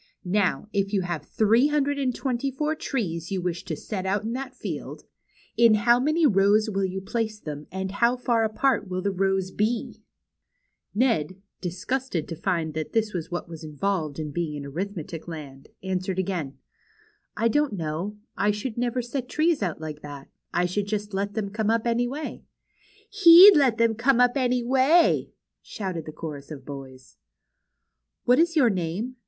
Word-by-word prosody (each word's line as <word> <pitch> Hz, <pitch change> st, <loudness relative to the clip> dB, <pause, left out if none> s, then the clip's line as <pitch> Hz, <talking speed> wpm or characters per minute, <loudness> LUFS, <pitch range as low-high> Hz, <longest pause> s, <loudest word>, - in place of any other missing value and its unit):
Now, 195 Hz, +2 st, 0 dB
if 200 Hz, 0 st, 0 dB
you 195 Hz, -, +2 dB
have 175 Hz, -4 st, -3 dB
three 225 Hz, +5 st, +3 dB
hundred 285 Hz, -1 st, 0 dB
and 255 Hz, -3 st, 0 dB
twenty 265 Hz, 0 st, -1 dB
four 300 Hz, +4 st, -1 dB
trees 185 Hz, -, -3 dB
you 195 Hz, -, -1 dB
wish 175 Hz, -1 st, -3 dB
to 160 Hz, -, -3 dB
set 190 Hz, +4 st, -5 dB
out 195 Hz, +2 st, 0 dB
in 225 Hz, +2 st, -3 dB
that 260 Hz, 0 st, -5 dB
field, -, -, -6 dB, 0.5 s
in 230 Hz, -2 st, +6 dB
how 235 Hz, +3 st, +4 dB
many 310 Hz, +5 st, +2 dB
rows 210 Hz, -1 st, +4 dB
will 195 Hz, 0 st, -1 dB
you 190 Hz, 0 st, -3 dB
place 215 Hz, +2 st, -3 dB
them, 150 Hz, -5 st, -7 dB
and 190 Hz, +1 st, -4 dB
how 235 Hz, +5 st, +2 dB
far 240 Hz, -2 st, +1 dB
apart 220 Hz, +1 st, +1 dB
will 185 Hz, 0 st, -3 dB
the 200 Hz, -, +1 dB
rows 190 Hz, 0 st, 0 dB
be? 220 Hz, +4 st, -2 dB, 0.5 s
" -, -, -45 dB
Ned, 190 Hz, -, +1 dB, 0.2 s
disgusted 185 Hz, -, -3 dB
to 165 Hz, -, -5 dB
find 165 Hz, -3 st, -1 dB
that 155 Hz, 0 st, -4 dB
this 220 Hz, -2 st, +1 dB
was 170 Hz, -4 st, -4 dB
what 175 Hz, 0 st, -4 dB
was 165 Hz, -1 st, -9 dB
involved 155 Hz, 0 st, -2 dB
in 155 Hz, -2 st, -4 dB
being 160 Hz, -1 st, -3 dB
in 145 Hz, -1 st, -6 dB
Arithmetic 165 Hz, +1 st, -5 dB
Land, 145 Hz, -5 st, -9 dB
answered 185 Hz, 0 st, -2 dB
again: 175 Hz, -7 st, -3 dB, 0.8 s
I 225 Hz, +2 st, +2 dB
don't 295 Hz, +1 st, +1 dB
know. 170 Hz, +4 st, -4 dB, 0.2 s
I 205 Hz, +2 st, +1 dB
should 215 Hz, +3 st, -3 dB
never 245 Hz, 0 st, -1 dB
set 250 Hz, +1 st, -4 dB
trees 315 Hz, -2 st, +1 dB
out 175 Hz, -6 st, -2 dB
like 155 Hz, -1 st, -7 dB
that. 145 Hz, -2 st, -9 dB, 0.2 s
I 175 Hz, -, +1 dB
should 200 Hz, +3 st, -2 dB
just 205 Hz, 0 st, -3 dB
let 200 Hz, +1 st, -2 dB
them 205 Hz, -3 st, -2 dB
come 215 Hz, 0 st, -1 dB
up 230 Hz, 0 st, +1 dB
any 240 Hz, +1 st, +1 dB
way." 290 Hz, +5 st, -6 dB, 0.6 s
He'd 390 Hz, -3 st, +9 dB
just 310 Hz, -, +5 dB
let 255 Hz, -5 st, +3 dB
them 230 Hz, -1 st, +3 dB
come 240 Hz, +3 st, +2 dB
up 245 Hz, 0 st, +5 dB
any 250 Hz, -2 st, +1 dB
way! 270 Hz, +7 st, +3 dB, 0.2 s
" -, -, -60 dB
shouted 185 Hz, -7 st, -5 dB
the -, -, -5 dB
chorus 150 Hz, -3 st, -8 dB
of 140 Hz, -4 st, -9 dB
boys. 130 Hz, -2 st, -10 dB, 1.1 s
What 245 Hz, +3 st, +5 dB
is 335 Hz, 0 st, +3 dB
your 255 Hz, -7 st, +5 dB
name 190 Hz, +8 st, -3 dB
205 Hz, 185 wpm, -25 LUFS, 175-245 Hz, 1.1 s, He'd